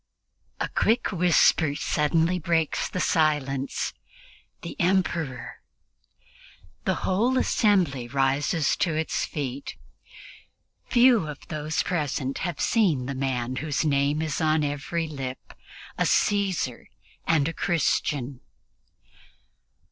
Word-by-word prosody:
A - - -1
quick 230 +2 +1
whisper 170 -4 +3
suddenly 160 +5 +1
breaks 165 -2 0
the 180 - -4
silence: 145 -5 0 0.7
"The 170 - -6
Emperor!" 170 -7 -1
and - - -29
the - - +1
whole 235 +8 +2
assembly 180 - +2
rises 140 +4 +1
to 165 -3 0
its 160 +1 -1
feet. 140 -2 -5 1.1
Few 240 -8 +4
of 150 -2 -9
those 155 0 -2
present 145 -6 -2
have 175 -5 -3
seen 175 - +2
the 140 - -3
man 130 -2 -2
whose 150 +1 -1
name 145 +1 +1
is 155 +1 -2
on 155 -1 +2
every 145 +3 -2
lip, 135 -4 -7 0.5
a - - +2
Caesar 190 - 0 0.4
and 155 -3 +3
a 165 - -3
Christian! 145 -6 -1
155 Hz, 110 wpm, -25 LUFS, 140-175 Hz, 1.1 s, Few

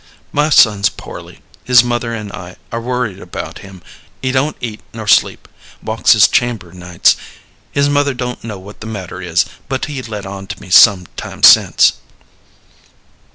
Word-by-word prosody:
My 150 +1 +1
son's 105 -7 +4
poorly. - - -11 0.2
His 125 -1 +5
mother 120 -1 -2
and 105 -3 -6
I 90 -3 -9 0.2
are 115 - -3
worried 120 -5 -3
about 90 - -8
him. 95 -2 -13 0.4
He 130 - -2
don't 135 +4 -1
eat 110 -3 -6
nor 110 -1 -6
sleep - - +2 0.4
walks 110 0 +3
his 105 -3 +6
chamber 115 -8 -1
nights. 90 -1 +1 0.6
His 140 0 +1
mother 145 -1 +1
don't 125 0 -5
know 110 -3 -6
what 100 +2 -13
the 110 - -7
matter 95 -4 -7
is, 85 -2 +1 0.2
but 130 -1 -2
he 145 -4 -6
let 105 -5 -7
on 95 0 -8
to - - -7
me 90 - -13
some 95 -2 +6
time - - -8
since." - - +6
110 Hz, 165 wpm, -15 LUFS, 95-125 Hz, 0.6 s, his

